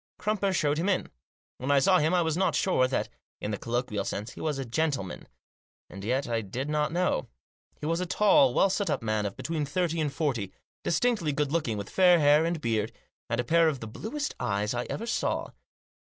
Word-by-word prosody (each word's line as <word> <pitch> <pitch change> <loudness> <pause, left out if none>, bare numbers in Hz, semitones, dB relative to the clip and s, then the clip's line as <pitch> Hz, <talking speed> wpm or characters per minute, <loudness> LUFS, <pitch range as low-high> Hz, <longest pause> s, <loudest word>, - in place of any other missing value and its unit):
Crumper 205 -2 0
showed 150 -4 +1
him 180 +4 0
in. 190 - 0 0.5
When 130 - -4
I 140 - +5
saw 185 +7 +5
him 155 +2 +2
I 180 -1 +3
was 160 -1 0
not 190 +2 +1
sure 130 -9 +2
that, 130 - -1 0.3
in 105 - -3
the 105 - -2
colloquial 115 -4 -2
sense, 105 +3 -4
he - - -10
was 150 -3 -1
a 135 - -3
gentle 140 +1 0
man. 90 - -9 0.6
And 95 0 -8
yet 130 +6 0
I 115 -1 0
did 125 +8 -4
not 150 0 +1
know. 175 - 0 0.5
He - - -6
was 165 +2 0
a 180 - -2
tall, 270 - +5
well 195 - +4
set 200 +1 -1
up - - -1
man 110 -2 0
of 100 - -8
between 160 -1 -2
thirty 165 +2 -1
and 150 -2 0
forty, 135 - -1 0.3
distinctly 175 -2 +1
good 145 0 -1
looking, 145 -10 0
with 100 -1 -5
fair 180 -2 +6
hair 150 0 +5
and 170 -1 -1
beard, 110 -4 -1 0.4
and 115 0 -1
a - - +2
pair 165 +6 +4
of 140 -4 -3
the 115 - -6
bluest 230 - -4
eyes 100 +2 -1
I 120 0 -2
ever 230 - -4
saw. 235 - -1
150 Hz, 220 wpm, -28 LUFS, 120-175 Hz, 0.6 s, fair